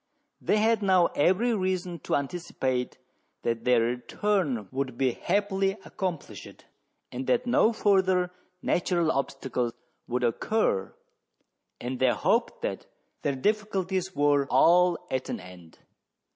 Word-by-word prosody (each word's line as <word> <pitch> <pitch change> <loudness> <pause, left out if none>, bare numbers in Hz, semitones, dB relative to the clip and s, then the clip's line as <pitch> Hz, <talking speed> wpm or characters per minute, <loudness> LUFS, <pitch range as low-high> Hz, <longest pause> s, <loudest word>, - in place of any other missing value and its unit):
They 210 - +2
had 220 +1 +3
now 185 -3 +4
ever}' 200 +10 +2
reason 185 -3 -2
to - - -1
anticipate 135 -4 -2 0.5
that 115 -1 -2
their 125 -2 +4
return 125 - -1
would 130 -2 -3
be 130 -1 +2
happily 195 - 0
accomplished, 180 -5 -6 0.5
and 130 +1 -5
that 245 0 +2
no 240 -2 +4
further 190 -4 +2 0.3
natural 170 -2 +1
obstacle 135 -3 -2 0.4
would 125 +1 -1
occur, 120 - 0 0.8
and 125 +1 -4
they 130 - +4
hoped 115 - 0
that - - -3 0.3
their 140 - 0
difficulties 190 +1 -1
were 145 -1 +3
all 175 +2 +5
at 130 0 -2
an - - -3
end. 90 -3 -13
170 Hz, 120 wpm, -27 LUFS, 130-190 Hz, 0.8 s, all